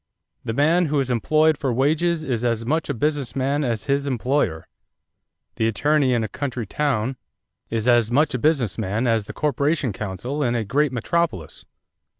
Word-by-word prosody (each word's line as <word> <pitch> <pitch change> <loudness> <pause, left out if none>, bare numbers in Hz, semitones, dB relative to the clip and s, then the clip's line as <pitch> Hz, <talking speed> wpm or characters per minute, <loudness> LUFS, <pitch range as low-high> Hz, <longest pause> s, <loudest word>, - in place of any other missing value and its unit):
"The 115 - -3
man 160 +7 +3
who 145 0 +1
is 130 -2 -1
employed 155 +6 +2
for 135 -3 0
wages 155 +6 +1
is 125 -6 -2
as 115 -1 0
much 155 +6 -1
a - - +1
business 140 -2 -1
man 140 +2 0
as 115 -5 -1
his 140 0 0
employer. 125 - -1 0.9
The 110 - +2
attorney 140 +3 +2
in 115 - 0
a - - -2
country 130 -4 -4
town 130 0 -1 0.5
is 115 0 -2
as 120 -3 +4
much 145 +4 +2
a 125 - -1
business 125 - +1
man 110 +3 -1
as 115 -3 +1
the - - -8
corporation 145 -3 0
counsel 110 +9 -4
in 120 -3 +1
a 115 - 0
great 145 +6 +1
metropolis. 125 - -2
130 Hz, 175 wpm, -22 LUFS, 115-150 Hz, 0.9 s, as